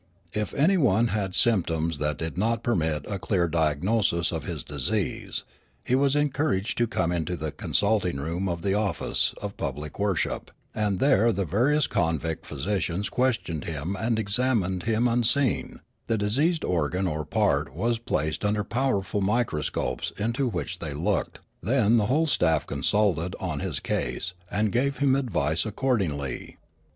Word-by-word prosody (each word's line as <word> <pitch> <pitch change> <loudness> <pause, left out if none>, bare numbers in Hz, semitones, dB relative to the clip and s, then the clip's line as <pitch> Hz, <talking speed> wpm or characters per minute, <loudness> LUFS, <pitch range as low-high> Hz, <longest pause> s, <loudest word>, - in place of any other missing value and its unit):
If 105 0 -2
anyone 140 - +3
had 100 -4 -2
symptoms 85 -8 +1
that 75 0 -1
did 80 0 -4
not 115 +4 0
permit 80 -9 0
of - - -8
a 100 - -2
clear 90 -2 +1
diagnosis 85 +3 +1
of 80 -4 -4
his - - -4
disease, 70 -4 -2 0.4
he - - -1
was 140 +1 +3
en 145 0 +3
couraged 130 -7 0
to 120 - +3
come 90 -6 0
into 85 0 -1
the 80 -1 -3
consulting 100 -4 0
room 85 +7 -2
of 85 -1 -3
the 95 - +1
office 100 -4 0
of - - -4
public 75 +4 -5
worship, 100 -3 -1 0.2
and 105 -3 0
there 115 -3 +4
the 100 -2 -1
various 130 - +2
convict 80 -1 -1
physi 80 +9 -1
cians 95 +2 -2
questioned 115 - 0
him 80 +4 -3
and 110 +3 0
examined 105 -4 +1
him 115 +2 +2
unseen; 120 +1 +1 0.3
the 115 - +1
diseased 140 +12 +1
organ 90 +2 0
or 75 -3 -1
part - - +1
was 115 0 0
placed 80 -8 -1
under 105 0 +1
powerful 105 -4 0
microscopes 105 -6 -1
into 115 +6 0
which 90 -7 -3
they - - -4
looked; - - -1 0.2
then 120 -2 +3
the 105 -2 +2
whole 150 +7 +3
staff 80 - +2
consulted 90 +3 +1
on 80 -6 -3
his - - -2
case 75 +9 -2 0.2
and 105 +2 0
gave 140 +5 +1
him 140 -2 +3
advice 85 - 0
accord 120 +2 0
ingly. 70 -7 -4
100 Hz, 160 wpm, -26 LUFS, 85-120 Hz, 0.4 s, there